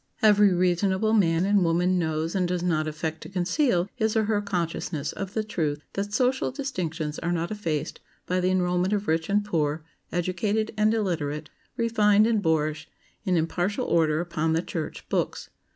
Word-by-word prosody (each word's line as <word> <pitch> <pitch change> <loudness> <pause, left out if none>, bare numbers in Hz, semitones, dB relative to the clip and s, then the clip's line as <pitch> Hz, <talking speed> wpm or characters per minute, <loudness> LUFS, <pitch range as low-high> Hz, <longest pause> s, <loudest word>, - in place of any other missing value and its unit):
Every 210 -2 +6
reasonable 190 +4 +2
man 170 -4 +3
and 200 -1 +3
woman 175 +2 +2
knows 160 0 -1
and 185 -2 +1
does 180 0 -2
not 155 -3 +1
affect 155 +1 -4
to - - -9
conceal 185 - +1
his 220 -2 0
or 220 - +3
her 210 -1 +1
consciousness 170 -5 -2
of 195 +1 -6
the 220 - +1
truth 150 -8 -2
that 200 +1 -3
social 255 +4 +1
distinctions 170 - -4
are 170 - -2
not 170 +1 -1
effaced 165 -9 -3 0.3
by 180 +1 0
the 180 0 +1
enrolment 180 +1 +1
of 205 0 -1
rich 160 +2 0
and 205 +1 +2
poor, 155 -5 -1 0.3
educated 200 +5 -1
and 215 0 +3
illiterate, 155 -7 -2 0.3
refined 215 -3 +4
and 225 -2 +2
boorish, 155 -3 0 0.4
in 185 -3 +2
impartial 175 +5 -1
order 155 -2 +2
upon 160 -2 -1
the 165 +2 +1
"church 160 -4 -5
books." - - -2
180 Hz, 170 wpm, -26 LUFS, 160-205 Hz, 0.4 s, Every